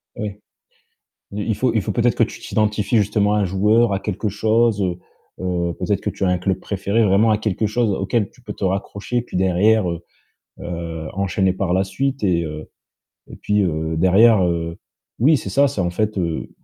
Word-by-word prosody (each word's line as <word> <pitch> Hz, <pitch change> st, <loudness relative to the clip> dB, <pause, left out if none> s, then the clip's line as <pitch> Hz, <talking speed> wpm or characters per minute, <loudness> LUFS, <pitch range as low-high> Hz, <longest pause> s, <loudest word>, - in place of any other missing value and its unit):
Ouais. 105 Hz, -1 st, -6 dB, 0.9 s
Il 105 Hz, -, -4 dB
il 110 Hz, -, +2 dB
faut 125 Hz, -2 st, +1 dB
il 110 Hz, -, +3 dB
faut -, -, -3 dB
peut-être 120 Hz, -2 st, +2 dB
que -, -, +1 dB
tu -, -, -10 dB
t'identifies 105 Hz, +1 st, 0 dB
justement 105 Hz, 0 st, +2 dB
à -, -, +2 dB
un -, -, +2 dB
joueur, 105 Hz, +4 st, +2 dB
à 95 Hz, -, -1 dB
quelque 105 Hz, +1 st, -3 dB
chose, 110 Hz, +1 st, +2 dB
heu, 90 Hz, -1 st, -1 dB, 0.4 s
heu, 90 Hz, -2 st, -1 dB
peut-être 100 Hz, -2 st, -1 dB
que 105 Hz, -, -1 dB
tu 100 Hz, +1 st, -3 dB
as 95 Hz, -, +2 dB
un 90 Hz, -, +1 dB
club 95 Hz, +1 st, -1 dB
préféré, 100 Hz, +3 st, 0 dB
vraiment 105 Hz, +3 st, +4 dB
à 105 Hz, -, +2 dB
quelque 110 Hz, 0 st, -1 dB
chose 110 Hz, +1 st, 0 dB
auquel 100 Hz, +2 st, -1 dB
tu 125 Hz, -, -23 dB
peux 105 Hz, -, -6 dB
te 100 Hz, -, -6 dB
raccrocher 100 Hz, +5 st, -2 dB
puis 115 Hz, -, -7 dB
derrière, 95 Hz, +3 st, +3 dB
heu, 85 Hz, -, -4 dB, 0.6 s
heu, 85 Hz, -2 st, -5 dB
enchaîner 95 Hz, 0 st, +1 dB
par 95 Hz, -1 st, -2 dB
la 95 Hz, +2 st, +2 dB
suite 135 Hz, +7 st, -2 dB
et 85 Hz, -3 st, +2 dB
heu 75 Hz, -1 st, -7 dB, 0.6 s
et -, -, -11 dB
puis, 105 Hz, 0 st, 0 dB
heu, 80 Hz, -3 st, -1 dB
derrière, 95 Hz, +4 st, +5 dB
heu 85 Hz, -1 st, -2 dB, 0.4 s
oui, 145 Hz, +6 st, +5 dB
c'est -, -, -6 dB
ça, 140 Hz, +1 st, +4 dB
c'est, 110 Hz, -, -5 dB
en 85 Hz, -1 st, 0 dB
fait, 105 Hz, +3 st, -1 dB
heu, 85 Hz, -3 st, -2 dB
100 Hz, 205 wpm, -20 LUFS, 90-110 Hz, 0.9 s, derrière